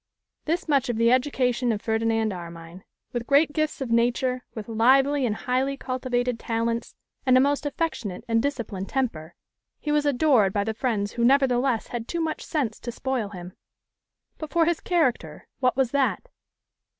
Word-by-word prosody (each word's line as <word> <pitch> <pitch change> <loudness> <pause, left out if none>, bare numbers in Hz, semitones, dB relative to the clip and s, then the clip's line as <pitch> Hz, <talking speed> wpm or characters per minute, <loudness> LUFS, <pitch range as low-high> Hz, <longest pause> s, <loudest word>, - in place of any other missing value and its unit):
This 335 +3 -1
much 275 -4 +2
of 240 - 0
the 230 +1 +4
education 250 -2 +1
of 215 - -1
Ferdinand 225 -1 0
Armine. 170 0 -9 0.3
With 240 -1 -3
great 290 +2 +4
gifts 310 -2 -1
of 255 -3 -3
nature, 245 +2 +1
with 215 -2 -6
lively 265 +4 +3
and 210 - -1
highly 260 +4 -1
cultivated 250 -2 -2
talents, 230 +1 -2 0.3
and 255 -2 +5
a - - +6
most 285 +2 +1
affectionate 270 - -3
and 230 -1 +2
disciplined 225 -8 -3
temper, 175 -12 -2 0.4
he 300 - -3
was 295 0 +2
adored 250 -8 +3
by 205 - +1
the 220 +2 -2
friends 215 -4 -1
who 235 - -2
nevertheless 255 -2 +2
had 235 -1 -5
too 340 - -3
much 320 -1 -2
sense 260 -9 -2
to 240 - -5
spoil 250 -4 -2
him. 180 -2 -9 0.9
But 310 - -5
for 335 0 +3
his 340 -1 +1
character, 250 - -1
what 255 -1 +1
was 260 -3 +2
that? 280 - 0
250 Hz, 170 wpm, -25 LUFS, 225-275 Hz, 0.9 s, a